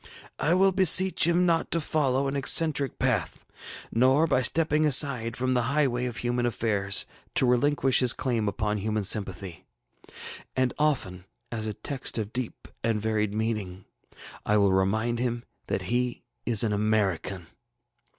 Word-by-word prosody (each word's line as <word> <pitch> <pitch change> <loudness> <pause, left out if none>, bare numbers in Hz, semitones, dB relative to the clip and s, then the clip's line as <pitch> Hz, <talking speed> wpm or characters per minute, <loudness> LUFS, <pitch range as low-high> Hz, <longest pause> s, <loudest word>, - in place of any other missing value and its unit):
I 165 +4 +2
will 195 +1 +4
beseech 185 -1 +5
him 175 +1 +2
not 165 -2 0
to 170 - 0
follow 140 -4 0
an 135 - -3
eccentric 140 0 +2
path, - - -2 0.5
nor, 130 +6 +3
by 130 -5 +1
stepping 155 +4 +2
aside 130 -6 +3
from 130 0 -1
the 125 - +1
highway 130 -4 0
of 120 -1 -6
human 120 0 -1
affairs, 100 -4 -1 0.3
to - - +3
relinquish 135 +2 +2
his 125 -2 +4
claim 120 -6 -2
upon 105 0 -2
human 105 +1 -2
sympathy. 95 -2 -2 0.9
And 130 -1 0
often, 100 -12 -1 0.3
as 110 -2 -3
a 105 - -3
text 135 -4 -1
of 110 -1 -4
deep 125 -2 -5 0.2
and 115 -1 0
varied 105 -1 -2
meaning, 105 -4 -4 0.6
I 105 - +1
will 100 -2 +3
remind 110 +5 0
him 120 -1 -2 0.2
that - - -2
he 125 0 -2 0.2
is 115 -3 +3
an 110 -2 0
American. 100 -4 -1
120 Hz, 150 wpm, -26 LUFS, 105-140 Hz, 0.9 s, beseech